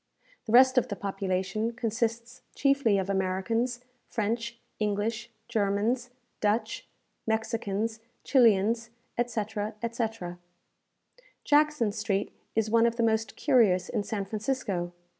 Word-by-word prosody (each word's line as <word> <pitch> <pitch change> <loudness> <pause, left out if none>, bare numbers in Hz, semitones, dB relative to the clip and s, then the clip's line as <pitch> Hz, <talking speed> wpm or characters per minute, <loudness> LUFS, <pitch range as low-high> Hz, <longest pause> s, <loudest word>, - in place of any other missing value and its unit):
The - - -2
rest 260 +2 +7
of - - -3
the 205 - -4
population 195 +3 -2
consists 230 +1 -2
chiefly 275 -7 +3
of 190 -1 -1
Americans, 200 +6 0 0.3
French, 230 +2 -2 0.2
English, 215 +3 -1 0.2
Germans, 225 +3 0 0.3
Dutch, 215 +2 0 0.4
Mexicans, 220 -1 -1 0.2
Chilians, 230 -2 +3 0.3
etc., 220 -2 -2
etc. 225 -7 -3 1.0
Jackson 300 -7 +3
Street 205 -1 -1 0.2
is 220 -1 +1
one 230 0 +5
of 230 - -1
the 235 - 0
most 225 0 +1
curious 225 -11 +3
in 220 - 0
San 200 -1 -3
Francisco. 205 -5 -2
225 Hz, 110 wpm, -28 LUFS, 205-235 Hz, 1.0 s, rest